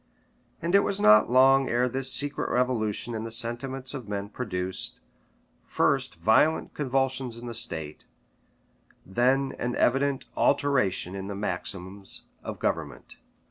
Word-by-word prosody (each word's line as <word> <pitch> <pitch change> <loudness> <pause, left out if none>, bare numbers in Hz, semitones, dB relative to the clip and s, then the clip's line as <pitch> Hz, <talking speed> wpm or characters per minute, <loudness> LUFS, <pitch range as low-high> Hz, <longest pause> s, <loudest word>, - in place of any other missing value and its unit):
And 170 +2 -1
it 200 - +7
was 200 0 -1
not 105 - +6
long 135 +2 +5
ere 120 +1 +2
this 130 +1 -1
secret 145 +1 0
revolution 120 -2 0
in 110 -1 -4
the 115 - -5
sentiments 125 +4 -3
of 130 -6 -7
men 100 0 -4
produced, 95 -6 -3 0.7
first - - +1
violent 110 - +2
convulsions 130 -3 -1
in 120 - -9
the 120 - -5
state, 80 -10 -3 1.0
then 130 +7 +1
an 125 0 -2
evident 135 +2 +1
alteration 125 -11 +1
in 95 0 -5
the 100 - -5
maxims 95 0 -5 0.2
of - - -6
government. - - -4
120 Hz, 135 wpm, -27 LUFS, 100-135 Hz, 1.0 s, it